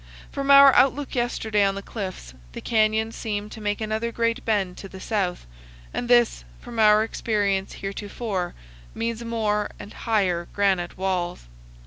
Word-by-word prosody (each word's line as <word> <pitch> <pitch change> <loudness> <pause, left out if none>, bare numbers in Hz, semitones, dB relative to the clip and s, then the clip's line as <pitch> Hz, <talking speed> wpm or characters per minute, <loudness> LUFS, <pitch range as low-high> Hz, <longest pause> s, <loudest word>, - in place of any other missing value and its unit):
From 275 0 -3
our 275 -1 +9
outlook 275 +2 +3
yesterday 220 -4 0
on 195 0 +1
the 200 - -6
cliffs, 185 - -6 0.2
the - - -6
canyon 220 0 +1
seemed 210 -2 -4
to 220 - -9
make 205 -1 -1
another 220 +1 -2
great 230 +1 -1
bend 200 -5 0
to 195 - -9
the 190 - -10
south, 190 - -2 0.5
and 240 - -3
this, 240 - +4 0.2
from 235 - -8
our 215 0 +6
experience 205 -4 -1
heretofore, 200 -2 -4 0.4
means 230 0 -3
more 215 -3 -1
and 205 - -10
higher 185 -7 0
granite 190 -4 0
walls. 180 - -2
210 Hz, 150 wpm, -24 LUFS, 195-230 Hz, 0.5 s, our